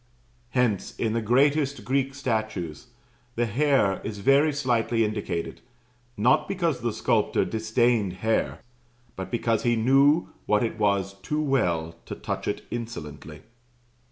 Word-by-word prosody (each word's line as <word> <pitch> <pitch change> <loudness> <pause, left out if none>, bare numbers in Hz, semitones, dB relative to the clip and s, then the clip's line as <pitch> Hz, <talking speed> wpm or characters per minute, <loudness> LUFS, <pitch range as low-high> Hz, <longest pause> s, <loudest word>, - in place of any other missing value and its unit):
Hence, 120 -6 0
in 110 -2 0
the 115 - 0
greatest 140 +1 +2
Greek 135 +2 0
statues, 110 - -3 0.5
the 120 - +1
hair 120 -4 +2
is 105 -1 -5
very 140 +9 +4
slightly 120 -5 +1
indicated 100 -5 -4 0.6
not 125 +8 +3
because 170 -8 -1
the 120 0 0
sculptor - - +1
disdained 110 -2 +1
hair, 110 +4 -1 0.5
but 95 - -6
because 115 -2 0
he 120 -1 +2
knew 135 +7 +4 0.2
what 105 +1 +3
it 110 -1 -3
was 100 -2 +1
too 150 - -2
well 85 - 0
to - - -5
touch - - -4
it - - -2
insolently. 80 -10 -7
115 Hz, 130 wpm, -26 LUFS, 105-135 Hz, 0.6 s, very